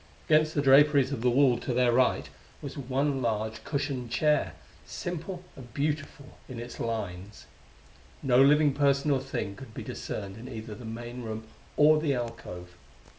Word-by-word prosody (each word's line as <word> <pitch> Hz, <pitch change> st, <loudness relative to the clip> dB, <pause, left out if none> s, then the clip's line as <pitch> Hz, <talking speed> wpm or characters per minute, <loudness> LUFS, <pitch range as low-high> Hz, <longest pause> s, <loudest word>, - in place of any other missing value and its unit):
Against 155 Hz, 0 st, +3 dB
the 145 Hz, -, +1 dB
draperies 140 Hz, 0 st, +5 dB
of 135 Hz, -5 st, -3 dB
the 125 Hz, -, +3 dB
wall 125 Hz, -1 st, +4 dB
to 125 Hz, -, -3 dB
their 125 Hz, -1 st, +4 dB
right 120 Hz, -, +2 dB, 0.3 s
was 140 Hz, -, -7 dB
one 135 Hz, 0 st, -1 dB
large 110 Hz, -1 st, -2 dB
cushioned 140 Hz, -4 st, -3 dB
chair, 150 Hz, +4 st, +1 dB, 0.3 s
simple 175 Hz, +1 st, -5 dB
and 120 Hz, -3 st, -12 dB
beautiful 145 Hz, -1 st, -3 dB
in 125 Hz, -2 st, -6 dB
its 120 Hz, +1 st, -8 dB
lines. 100 Hz, -3 st, -5 dB, 0.8 s
No 130 Hz, -1 st, +5 dB
living 145 Hz, +1 st, +5 dB
person 140 Hz, +1 st, +2 dB
or 135 Hz, -, +3 dB
thing 130 Hz, -7 st, -4 dB
could 115 Hz, 0 st, -12 dB
be -, -, -5 dB
discerned 100 Hz, -1 st, -6 dB
in 120 Hz, +3 st, -9 dB
either 110 Hz, -3 st, -7 dB
the 115 Hz, +3 st, -10 dB
main 120 Hz, +2 st, -6 dB
room 110 Hz, -1 st, -5 dB, 0.3 s
or 155 Hz, +1 st, +6 dB
the 145 Hz, -4 st, +1 dB
alcove. 90 Hz, -7 st, -6 dB
130 Hz, 165 wpm, -28 LUFS, 115-145 Hz, 0.8 s, or